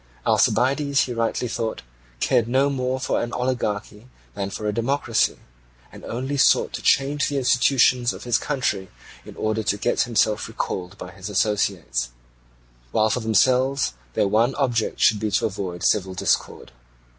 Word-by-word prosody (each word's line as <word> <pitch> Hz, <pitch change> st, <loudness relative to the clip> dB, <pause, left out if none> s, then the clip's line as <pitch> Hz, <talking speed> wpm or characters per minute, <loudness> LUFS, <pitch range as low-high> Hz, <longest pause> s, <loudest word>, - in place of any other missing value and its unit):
Alcibiades, 140 Hz, +5 st, +2 dB
he 125 Hz, -, -2 dB
rightly 115 Hz, +1 st, -1 dB
thought, 115 Hz, -1 st, -3 dB, 0.4 s
cared 115 Hz, -, +2 dB
no 135 Hz, +3 st, +2 dB
more 130 Hz, -1 st, -2 dB
for -, -, -1 dB
an 120 Hz, -, -4 dB
oligarchy 110 Hz, -3 st, -3 dB, 0.3 s
than 100 Hz, -1 st, -3 dB
for 105 Hz, +2 st, -6 dB
a 105 Hz, -, 0 dB
democracy, 115 Hz, -1 st, 0 dB, 0.5 s
and -, -, -13 dB
only 130 Hz, +4 st, -3 dB
sought 135 Hz, -, +3 dB
to -, -, -5 dB
change 140 Hz, +1 st, +2 dB
the 145 Hz, -, -2 dB
institutions 125 Hz, -1 st, +3 dB
of -, -, -9 dB
his 120 Hz, -2 st, +1 dB
country 120 Hz, -10 st, -2 dB, 0.4 s
in -, -, -10 dB
order 110 Hz, 0 st, -1 dB
to 105 Hz, -1 st, 0 dB
get 120 Hz, +4 st, 0 dB
himself 110 Hz, -2 st, +1 dB
recalled 95 Hz, -4 st, -5 dB
by 90 Hz, -, -8 dB
his 95 Hz, +2 st, -8 dB
associates; 95 Hz, -, 0 dB, 0.8 s
while 110 Hz, 0 st, +2 dB
for 125 Hz, -, 0 dB
themselves 125 Hz, -, +2 dB, 0.2 s
their -, -, +2 dB
one 115 Hz, +6 st, +2 dB
object 120 Hz, -5 st, -1 dB
should 105 Hz, -, +4 dB
be 110 Hz, -, -1 dB
to 100 Hz, -, +1 dB
avoid 95 Hz, -4 st, -4 dB
civil 95 Hz, -3 st, +1 dB
discord. -, -, -1 dB
115 Hz, 155 wpm, -23 LUFS, 105-130 Hz, 0.8 s, should